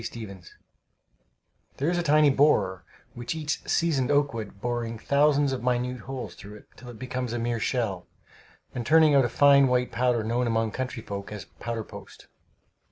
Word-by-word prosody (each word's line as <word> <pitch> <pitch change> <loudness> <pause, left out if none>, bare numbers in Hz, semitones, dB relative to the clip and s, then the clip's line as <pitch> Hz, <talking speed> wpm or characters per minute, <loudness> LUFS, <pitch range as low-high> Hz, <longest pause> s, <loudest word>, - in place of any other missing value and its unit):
Stephens 100 -7 -9 1.2
There 140 - -1
is 175 - 0
a - - +1
tiny 150 -2 +4
borer 100 -10 +2 0.3
which 120 +5 -5
eats 150 -1 -2
seasoned 145 -6 +1
oak 145 -1 +2
wood, 105 -3 -7
boring 120 0 -3
thousands 140 +2 +2
of 130 - -4
minute 125 0 -1
holes 130 -1 -6
through 105 +1 -12
it 105 - -14
till 125 - -12
it 120 - -10
becomes 125 0 -4
a - - -1
mere 120 0 -1
shell, 105 -7 -2 0.7
and 120 - -4
turning 155 +3 +5
out 135 -3 +5
a - - -1
fine 140 -1 +5
white 125 0 +1
powder 125 -2 +1
known 120 +3 0
among 115 -1 0
country 130 -2 -5
folk 100 -1 -6
as 105 -2 -7
"powder 115 -1 -6
post." - - -13
125 Hz, 175 wpm, -26 LUFS, 115-140 Hz, 1.2 s, turning